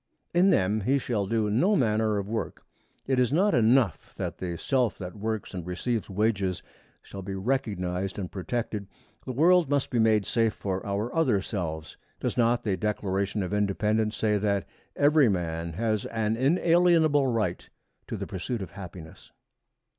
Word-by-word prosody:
In 180 Hz, +3 st, +5 dB
them 105 Hz, -, +2 dB
he 130 Hz, +8 st, +2 dB
shall 110 Hz, -7 st, -1 dB
do 110 Hz, 0 st, +1 dB
no 180 Hz, -, +3 dB
manner 110 Hz, -, +2 dB
of 100 Hz, -1 st, -3 dB
work. 110 Hz, +1 st, -4 dB, 0.4 s
It 130 Hz, -1 st, +1 dB
is 125 Hz, -1 st, +2 dB
not 190 Hz, +7 st, +3 dB
enough 115 Hz, -, +2 dB
that -, -, -4 dB
the 90 Hz, -2 st, -4 dB
self 125 Hz, -1 st, 0 dB
that 90 Hz, +1 st, -7 dB
works 110 Hz, 0 st, -4 dB
and 90 Hz, -2 st, -4 dB
receives 100 Hz, +6 st, -3 dB
wages 100 Hz, -2 st, 0 dB, 0.4 s
shall 100 Hz, -, -8 dB
be 95 Hz, +1 st, -5 dB
recognized 95 Hz, -5 st, -2 dB
and 95 Hz, -4 st, -4 dB
protected; 105 Hz, 0 st, -3 dB, 0.4 s
the -, -, -3 dB
world 165 Hz, +4 st, +4 dB
must 140 Hz, -2 st, 0 dB
be 120 Hz, -, +1 dB
made 110 Hz, -2 st, +3 dB
safe 115 Hz, -2 st, +1 dB
for 95 Hz, -1 st, -3 dB
our 100 Hz, +4 st, -2 dB
other 130 Hz, -11 st, +3 dB
selves. 85 Hz, -6 st, -5 dB, 0.2 s
Does -, -, -2 dB
not 120 Hz, 0 st, +2 dB
the 100 Hz, -4 st, 0 dB
Declaration 100 Hz, 0 st, -1 dB
of 95 Hz, -, -4 dB
Independence 105 Hz, +2 st, 0 dB
say 105 Hz, -2 st, +1 dB
that 100 Hz, -1 st, 0 dB, 0.3 s
every 145 Hz, -3 st, +4 dB
man 85 Hz, -3 st, -2 dB
has 110 Hz, +3 st, -1 dB
an 110 Hz, -1 st, -1 dB
inalienable 160 Hz, +1 st, +3 dB
right 110 Hz, -8 st, -1 dB, 0.4 s
to -, -, -4 dB
the -, -, -4 dB
pursuit 95 Hz, +4 st, -4 dB
of -, -, -9 dB
happiness? 90 Hz, -4 st, -11 dB
110 Hz, 165 wpm, -27 LUFS, 95-125 Hz, 0.4 s, In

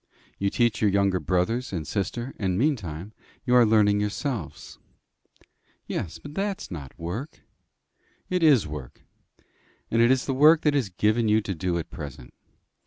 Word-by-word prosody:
You 100 Hz, -, +1 dB
teach 120 Hz, 0 st, +1 dB
your 105 Hz, -, +4 dB
younger 100 Hz, -1 st, +2 dB
brothers 90 Hz, -, -1 dB
and 85 Hz, -5 st, -3 dB
sister, 120 Hz, +5 st, -3 dB
and 95 Hz, -3 st, 0 dB
meantime 105 Hz, -, -2 dB, 0.3 s
you 125 Hz, -, +1 dB
are 120 Hz, -2 st, +6 dB
learning 105 Hz, -2 st, +4 dB
yourselves." 105 Hz, -, -4 dB, 1.1 s
"Yes, 80 Hz, -3 st, -4 dB
but 145 Hz, -, -11 dB
that's 195 Hz, -, -3 dB
not 75 Hz, -6 st, -8 dB
work." 100 Hz, -, -6 dB, 0.9 s
"It 180 Hz, -1 st, -1 dB
is 145 Hz, -9 st, +5 dB
work. 75 Hz, -4 st, -8 dB, 0.9 s
And 115 Hz, -, +3 dB
it 120 Hz, -, +5 dB
is 130 Hz, 0 st, +2 dB
the 135 Hz, -, -1 dB
work 155 Hz, +4 st, +6 dB
that 150 Hz, -, +2 dB
is 135 Hz, -8 st, 0 dB
given 110 Hz, +5 st, +1 dB
you 105 Hz, +1 st, +4 dB
to 100 Hz, -, -4 dB
do 90 Hz, 0 st, -2 dB
at 85 Hz, -, -5 dB
present. 65 Hz, -4 st, -9 dB
105 Hz, 160 wpm, -25 LUFS, 90-130 Hz, 1.1 s, are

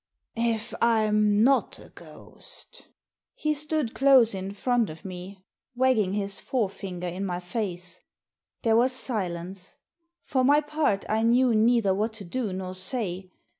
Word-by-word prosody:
" -, -, -50 dB, 0.2 s
If 220 Hz, 0 st, -8 dB
I'm 215 Hz, -2 st, +3 dB
not 270 Hz, +2 st, +3 dB
a -, -, -14 dB
ghost" -, -, -11 dB, 0.5 s
He 305 Hz, 0 st, 0 dB
stood 300 Hz, -4 st, 0 dB
close 265 Hz, -5 st, +5 dB
in 190 Hz, 0 st, -4 dB
front 235 Hz, +2 st, 0 dB
of 155 Hz, +3 st, -11 dB
me, 185 Hz, +1 st, -9 dB, 0.3 s
wagging 240 Hz, -7 st, +2 dB
his 200 Hz, -1 st, -1 dB
fore 225 Hz, -7 st, -1 dB
finger 180 Hz, -3 st, -7 dB
in 180 Hz, +2 st, -4 dB
my 180 Hz, -2 st, -2 dB
face. 180 Hz, -2 st, -5 dB, 0.6 s
There 225 Hz, -1 st, +3 dB
was 250 Hz, +3 st, +3 dB
silence. 185 Hz, -7 st, -3 dB, 0.5 s
For 260 Hz, -2 st, 0 dB
my 290 Hz, +3 st, +5 dB
part, 295 Hz, -9 st, -1 dB
I 220 Hz, +1 st, +1 dB
knew 240 Hz, +2 st, +4 dB
neither 220 Hz, -2 st, +3 dB
what 215 Hz, +3 st, -1 dB
to 215 Hz, -3 st, -6 dB
do 220 Hz, +3 st, -3 dB
nor 185 Hz, 0 st, -5 dB
say. 185 Hz, -1 st, -3 dB
215 Hz, 150 wpm, -26 LUFS, 185-245 Hz, 0.6 s, close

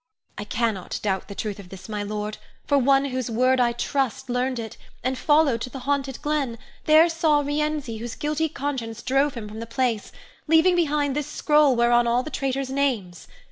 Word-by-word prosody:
I 205 Hz, -, -6 dB
cannot 215 Hz, -3 st, -2 dB
doubt 190 Hz, -2 st, -1 dB
the 200 Hz, -, -8 dB
truth 210 Hz, -1 st, -4 dB
of 190 Hz, -3 st, -11 dB
this, 190 Hz, 0 st, -10 dB
my 210 Hz, -1 st, -3 dB
lord, 210 Hz, +1 st, -4 dB, 0.3 s
for 285 Hz, -1 st, +3 dB
one 275 Hz, +1 st, +4 dB
whose 255 Hz, -3 st, -3 dB
word 255 Hz, +3 st, +2 dB
I 240 Hz, -1 st, +3 dB
trust 260 Hz, +1 st, -2 dB
learned 250 Hz, +1 st, 0 dB
it, 225 Hz, -1 st, -6 dB, 0.3 s
and 260 Hz, +2 st, 0 dB
followed 295 Hz, -4 st, +3 dB
to 250 Hz, -, -4 dB
the 265 Hz, +1 st, -8 dB
haunted 275 Hz, -2 st, -1 dB
glen, 290 Hz, -6 st, -1 dB, 0.3 s
there 310 Hz, +2 st, +7 dB
saw 320 Hz, -3 st, +2 dB
Rienzi, 290 Hz, -4 st, -2 dB
whose 235 Hz, +1 st, -6 dB
guilty 305 Hz, +2 st, -1 dB
conscience 255 Hz, -7 st, -4 dB
drove 275 Hz, +1 st, +1 dB
him 225 Hz, -3 st, -6 dB
from 215 Hz, +1 st, -8 dB
the 230 Hz, -, -6 dB
place, 235 Hz, -3 st, -1 dB, 0.4 s
leaving 325 Hz, +3 st, +5 dB
behind 295 Hz, -4 st, +1 dB
this 295 Hz, -2 st, -2 dB
scroll 295 Hz, -3 st, +3 dB
whereon 240 Hz, 0 st, +3 dB
are 235 Hz, -, +2 dB
all 250 Hz, -, +2 dB
the 310 Hz, -, -7 dB
traitors' 270 Hz, -1 st, -2 dB
names. 240 Hz, -11 st, -1 dB
260 Hz, 195 wpm, -24 LUFS, 230-290 Hz, 0.4 s, there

